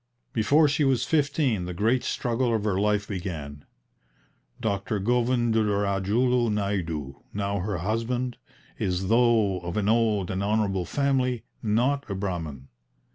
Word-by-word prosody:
Before 145 +8 +4
she 150 +1 +1
was 135 -3 +2
fifteen 140 - +1
the 90 0 -5
great 115 +7 +2
struggle 120 0 0
of 110 - -1
her 100 -3 0
life 105 0 +1
began. 80 -7 -5 0.9
Dr. 100 -1 -1
Govindurajulu 115 0 +1
Naidu, 85 -9 -2
now 100 0 -1
her 95 +1 -2
husband, 115 +6 -2 0.4
is, 95 0 -1
though 115 -5 +3
of 85 +2 -5
an 105 -1 0
old 110 -4 +2
and 95 +1 -2
honourable 100 -3 0
family, 130 -3 0 0.2
not 125 +6 +1
a 100 - -2
Brahmin. 80 -9 -4
105 Hz, 130 wpm, -26 LUFS, 95-120 Hz, 0.9 s, Before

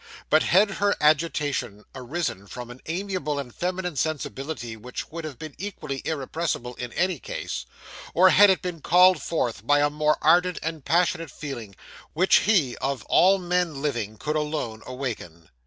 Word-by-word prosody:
But 155 - +6
had 195 +3 +4
her 200 +1 +1
agitation 145 -8 +1
arisen 125 - -4
from 120 +3 -8
an 125 - -12
amiable 175 -4 -2
and 130 -4 -5
feminine 180 -1 -3
sensibility 135 -4 -3
which 125 +7 -7
would 165 +1 -6
have 145 -5 -7
been 155 +2 -8
equally 150 -8 -5
irrepressible 150 -4 -2
in 125 -1 -6
any 185 -3 0
case; - - -5 0.5
or 185 +2 +7
had 205 +1 +7
it 190 - +2
been 175 -3 -4
called 180 -1 +5
forth 125 - -2
by 145 - +5
a 145 0 +2
more 150 0 +2
ardent 175 +3 +4
and 160 -2 -4
passionate 165 +1 +1
feeling, 120 -9 -7 0.4
which 185 +5 +5
he, 170 - +2
of 135 -4 -2
all 190 +2 +5
men 180 -4 -1
living, 115 -7 -2
could 150 +9 -3
alone 150 -8 -2
awaken? 115 - -6
150 Hz, 160 wpm, -25 LUFS, 125-175 Hz, 0.5 s, or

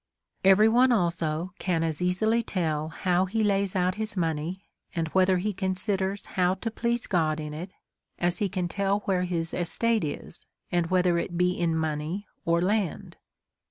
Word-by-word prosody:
Every 195 +3 +7
one 250 +3 +5
also 170 -4 0
can 170 -3 0
as 160 0 -2
easily 220 +6 +2
tell 160 -7 -1
how 180 +2 +1
he 220 +3 0
lays 200 -2 +1
out 180 0 +2
his 215 -2 -4
money, 165 +3 -2 0.3
and 165 -1 0
whether 185 +1 +3
he 205 +4 -1
considers 190 +1 -1
how 185 -1 +1
to 225 +4 -4
please 235 +1 -1
God 160 -4 +1
in 150 -1 -5
it, 175 +5 -7 0.4
as 175 0 0
he 205 - +1
can 180 -1 -2
tell 200 +2 0
where 185 -3 0
his 165 -2 -2
estate 225 +6 +1
is, 150 - -6 0.2
and 175 -1 +1
whether 180 -1 +2
it 175 0 -4
be 180 +1 +3
in 170 -2 0
money 160 +5 -2 0.2
or 170 +1 +2
land. 200 -3 -1
180 Hz, 170 wpm, -27 LUFS, 170-200 Hz, 0.4 s, Every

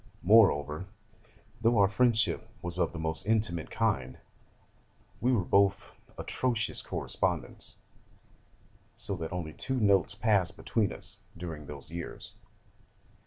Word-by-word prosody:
Moreover, 90 -5 +4 0.7
though 115 0 +3
our 100 -1 +6
friendship 115 +2 +2
was 85 +1 -2
of 85 - +1
the 85 - -8
most 80 +3 -1
intimate 105 -7 +1
kind, 65 -1 -1 1.0
we 125 - +2
were 115 -7 +2
both 100 +1 +2 0.3
atrocious 120 -4 -1
correspondents: - - -1 1.2
so 100 - -1
that 80 -2 -5
only 85 -3 -4
two 130 - -1
notes 100 -4 +3
passed 100 -3 +1
between 110 -3 0
us - - -4 0.2
during 80 -4 -7
those 75 +1 -10
years. 85 0 -7
95 Hz, 120 wpm, -30 LUFS, 80-110 Hz, 1.2 s, our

